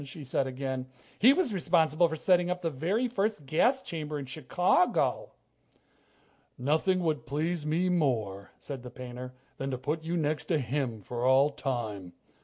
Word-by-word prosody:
she 145 +2 -9
said 135 0 0
again. 130 0 -4 0.3
"He 245 +5 +8
was 285 - +1
responsible 170 -2 +3
for 160 - -4
setting 180 +2 +3
up 180 0 -2
the 165 - 0
very 185 - 0
first 210 - -1
gas 245 - +2
chamber 155 -2 -4
in 140 - -5
Chicago." 175 - +1 1.2
"Nothing 160 +8 +1
would 155 -4 -1
please 155 +3 -1
me 170 +4 +1
more," 115 - 0
said 135 -3 -7
the 125 - -8
painter, 125 0 -8 0.2
"than 135 - -3
to 130 - -2
put 150 +5 -3
you 170 +2 -1
next 155 -1 -1
to 165 - +1
him 125 -5 -2
for 120 +4 -4
all 135 +3 +5
time. 110 -10 -4
150 Hz, 165 wpm, -29 LUFS, 130-175 Hz, 1.2 s, He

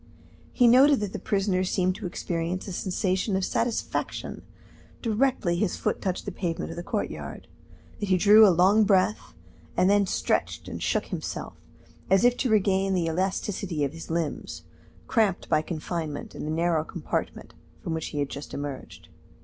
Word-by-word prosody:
He 245 - +4
noted 265 +4 +6
that 205 -2 -3
the - - -4
prisoner 195 -2 0
seemed 185 0 +1
to - - -5
experience 175 +1 -3
a 190 - -5
sensation 190 +2 -1
of 190 -1 0
satisfaction 230 -1 -2 0.6
directly 225 -6 +1
his 185 -1 0
foot - - -1
touched 185 -2 -2
the 200 - -3
pavement 175 -3 -3
of - - -7
the 175 - -5
courtyard, 210 +3 -4 0.5
that 205 - -3
he 185 - +4
drew 210 +3 +8
a - - +6
long 190 +5 +5
breath, 200 +1 +1 0.4
and 185 +2 +4
then 205 -1 +3
stretched - - -1
and - - -6
shook - - 0
himself, - - -5 0.6
as 195 +4 +4
if 245 0 +5
to 255 - 0
regain 195 -2 +2
the 175 -2 +1
elasticity 185 -1 -2
of 140 +1 -1
his 165 - -9
limbs, 165 -2 -3 0.4
cramped 215 -6 +1
by 155 - +3
confinement 155 -2 -5
in - - -6
the - - -3
narrow 165 -1 +1
compartment 170 0 -4 0.3
from 160 - -4
which 160 -1 -3
he - - -6
had 140 -1 0
just 140 - -7
emerged. 130 - -7
185 Hz, 170 wpm, -26 LUFS, 165-205 Hz, 0.6 s, drew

